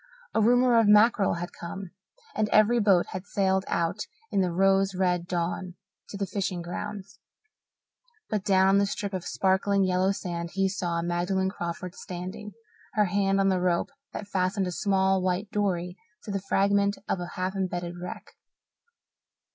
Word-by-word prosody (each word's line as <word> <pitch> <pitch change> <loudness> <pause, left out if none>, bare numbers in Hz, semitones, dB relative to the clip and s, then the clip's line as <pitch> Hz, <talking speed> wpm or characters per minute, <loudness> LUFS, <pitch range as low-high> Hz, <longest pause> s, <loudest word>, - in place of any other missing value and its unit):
A - - +2
rumour 245 +1 +5
of 225 - +3
mackerel 210 -2 +5
had 175 +1 -5
come, 180 +1 -7 0.4
and 215 -1 0
every 215 +3 +4
boat 195 -5 +4
had 185 +2 -6
sailed 190 -1 +1
out 170 +5 -1 0.2
in 195 - +2
the 180 -2 0
rose 195 +2 +2
red 180 -2 0
dawn 175 +1 -3 0.3
to 200 - -6
the 195 - -1
fishing 185 -2 -3
grounds. 200 +2 -6 1.1
But 210 -3 -2
down 190 -2 +4
on 200 +1 +4
a 200 - +2
strip 200 0 -4
of 185 -2 -3
sparkling 195 +1 +2
yellow 185 +1 +2
sand 170 -3 -4
he 195 +1 +2
saw 175 -3 -2
Magdalen 180 +2 0
Crawford 170 -1 -5
standing, 185 +4 -7 0.4
her 210 -1 +3
hand 195 +1 +1
on 195 0 +3
the 185 -1 +1
rope 180 +6 +1 0.2
that 210 - -6
fastened 190 0 0
a 180 - -3
small 190 0 +2
white 185 +3 -1
dory 180 -3 -1 0.3
to 210 - -6
the 195 -1 -2
fragment 200 +1 +2
of - - -1
a 175 -1 -6
half 185 +1 -1
embedded 175 -2 -3
wreck. 180 - -7
190 Hz, 165 wpm, -27 LUFS, 180-200 Hz, 1.1 s, rumour